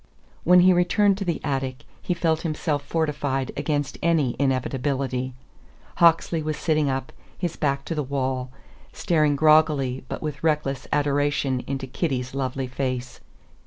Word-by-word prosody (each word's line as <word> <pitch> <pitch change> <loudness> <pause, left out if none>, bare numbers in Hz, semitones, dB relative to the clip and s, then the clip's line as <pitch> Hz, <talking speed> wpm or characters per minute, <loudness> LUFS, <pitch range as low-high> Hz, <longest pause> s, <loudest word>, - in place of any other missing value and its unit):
When 180 +1 +6
he 185 +1 +6
returned 190 +3 +3
to 200 - -3
the 170 -2 -1
attic 135 -1 -2 0.2
he 180 - -1
felt 165 -2 +1
himself 155 -2 -1
fortified 145 -5 -1
against 145 -3 -2
any 155 -7 +2
inevitability. 130 -1 -1 0.6
Hawksley 165 -1 +4
was 155 -1 -3
sitting 155 -2 +1
up, 130 0 -3 0.2
his 175 -3 -3
back 140 -2 -1
to - - -3
the 150 - -1
wall, 130 -2 -2 0.4
staring 155 -4 +1
groggily 150 -4 +3
but - - -5
with 150 0 -5
reckless 150 -4 0
adoration 145 -2 +1
into 135 -1 -3
Kitty's 130 -2 -2
lovely 135 -1 -2
face. 125 -1 -4
145 Hz, 140 wpm, -24 LUFS, 130-160 Hz, 0.6 s, When